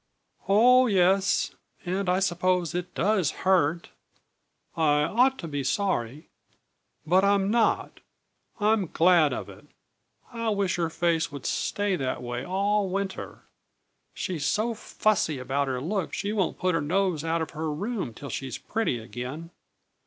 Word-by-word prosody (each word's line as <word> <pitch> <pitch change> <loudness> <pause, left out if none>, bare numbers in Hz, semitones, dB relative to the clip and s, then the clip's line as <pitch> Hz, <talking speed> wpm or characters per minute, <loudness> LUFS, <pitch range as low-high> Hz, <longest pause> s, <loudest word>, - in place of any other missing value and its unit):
"Oh, 250 +5 +6
yes 190 -1 +2 0.3
and 185 +1 -1
I 180 - +3
suppose 180 -2 +1
it 180 0 -4
does 190 -4 +2 0.2
hurt, 170 -3 +2 0.8
and 165 - -1
I 150 -1 +3
ought 255 - +2
to 170 - -6
be 145 -3 -3
sorry. 145 - -1 0.8
But 185 +4 +3
I'm 200 0 +2
not. 230 -1 +1 0.6
I'm 210 -2 +2
glad 165 -2 +4
of - - -4
it. - - -14 0.7
I 230 -1 -2
wish 200 -4 0
her 170 -2 0
face 165 -1 0
would 140 -2 -8
stay 205 -2 0
that 130 -2 -3
way 120 +1 -4
all 200 +3 0
winter! 195 0 -4 0.7
She's 155 -6 -3
so 225 +3 0
fussy 210 -8 0
about 135 +2 -1
her 130 -1 -2
looks 180 +5 -3
she 205 +1 -2
won't 195 -5 0
put 185 +1 0
her 165 - +1
nose 175 0 0
out 165 0 0
of - - -7
her 155 0 -3
room 200 - -3
till 140 0 -8
she's 130 -1 -4
pretty 220 - -2
again. 125 +8 -7
180 Hz, 150 wpm, -26 LUFS, 150-200 Hz, 0.8 s, Oh